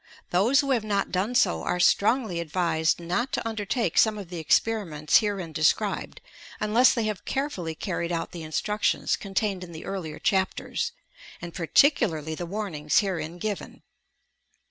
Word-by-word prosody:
Those 230 Hz, +11 st, +4 dB
who 275 Hz, -1 st, -2 dB
have 240 Hz, -4 st, +2 dB
not 200 Hz, -2 st, -1 dB
done 195 Hz, +7 st, -1 dB
so 80 Hz, -, +3 dB
are 180 Hz, -, -1 dB
strongly 210 Hz, 0 st, +3 dB
advised 165 Hz, -1 st, 0 dB
not 180 Hz, +10 st, -2 dB
to -, -, -1 dB
undertake 220 Hz, -3 st, 0 dB
some 220 Hz, -1 st, +4 dB
of 195 Hz, -4 st, -8 dB
the 175 Hz, -2 st, -5 dB
experiments 160 Hz, -3 st, +2 dB
herein 195 Hz, -7 st, -3 dB
described 155 Hz, 0 st, 0 dB, 0.4 s
unless 220 Hz, +4 st, +4 dB
they 230 Hz, -, 0 dB
have 215 Hz, -2 st, -3 dB
carefully 190 Hz, -, -3 dB
carried 170 Hz, -1 st, -3 dB
out 165 Hz, -1 st, -2 dB
the 170 Hz, -, -7 dB
instructions 210 Hz, +7 st, 0 dB
contained 195 Hz, -1 st, -2 dB
in 170 Hz, -2 st, -10 dB
the 160 Hz, -, -8 dB
earlier 170 Hz, -6 st, -5 dB
chapters, 190 Hz, -1 st, -1 dB, 0.5 s
and 175 Hz, -1 st, -8 dB
par 165 Hz, -3 st, -4 dB
ticularly 160 Hz, -, +3 dB
the 175 Hz, +2 st, -5 dB
warnings 165 Hz, -7 st, -2 dB
herein 175 Hz, -5 st, 0 dB
given. 205 Hz, +3 st, -5 dB
190 Hz, 155 wpm, -26 LUFS, 165-215 Hz, 0.5 s, Those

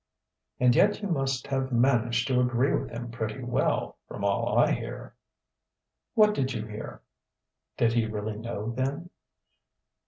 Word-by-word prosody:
"And 125 Hz, -1 st, +4 dB
yet 210 Hz, +1 st, +3 dB
you -, -, 0 dB
must 135 Hz, -5 st, 0 dB
have 135 Hz, -1 st, -2 dB
managed 120 Hz, -1 st, +2 dB
to 130 Hz, -2 st, +2 dB
agree 125 Hz, +2 st, +2 dB
with -, -, -1 dB
him 120 Hz, +1 st, -6 dB
pretty 115 Hz, +2 st, -4 dB
well, 120 Hz, 0 st, 0 dB
from 100 Hz, -, -7 dB
all 100 Hz, -1 st, +1 dB
I -, -, +5 dB
hear." -, -, -4 dB, 1.0 s
"What 210 Hz, -1 st, +6 dB
did 135 Hz, -7 st, -1 dB
you 110 Hz, -3 st, -3 dB
hear?" 105 Hz, 0 st, -8 dB, 0.7 s
(Did 115 Hz, -1 st, +3 dB
he 115 Hz, -2 st, +2 dB
really 105 Hz, 0 st, -4 dB
know, 115 Hz, -1 st, -4 dB
then?) 135 Hz, +8 st, -3 dB
120 Hz, 150 wpm, -28 LUFS, 115-135 Hz, 1.0 s, What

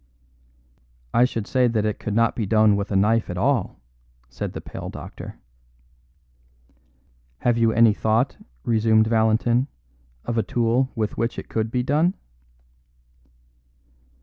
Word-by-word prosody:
"I 120 Hz, -, +5 dB
should 115 Hz, -4 st, -3 dB
say 130 Hz, +1 st, +2 dB
that 110 Hz, -3 st, 0 dB
it 105 Hz, -1 st, -2 dB
could 105 Hz, -, -4 dB
not 115 Hz, 0 st, +2 dB
be 110 Hz, -4 st, -2 dB
done 110 Hz, 0 st, +4 dB
with 100 Hz, 0 st, -3 dB
a -, -, 0 dB
knife 110 Hz, +4 st, +2 dB
at 90 Hz, -, -4 dB
all," 125 Hz, 0 st, 0 dB, 0.5 s
said -, -, -5 dB
the -, -, -5 dB
pale -, -, -8 dB
doctor. -, -, -9 dB, 2.1 s
"Have 120 Hz, -1 st, +2 dB
you 115 Hz, -1 st, +3 dB
any 115 Hz, -1 st, +5 dB
thought," 110 Hz, +5 st, 0 dB, 0.3 s
resumed 110 Hz, -1 st, +3 dB
Valentin, 115 Hz, +3 st, +2 dB, 0.6 s
"of 115 Hz, -1 st, -1 dB
a -, -, +4 dB
tool 120 Hz, +2 st, +1 dB
with 110 Hz, -3 st, -3 dB
which 115 Hz, +1 st, -1 dB
it -, -, -7 dB
could 110 Hz, 0 st, -1 dB
be 125 Hz, +1 st, -1 dB
done?" 155 Hz, +8 st, +1 dB
115 Hz, 140 wpm, -23 LUFS, 110-120 Hz, 2.1 s, I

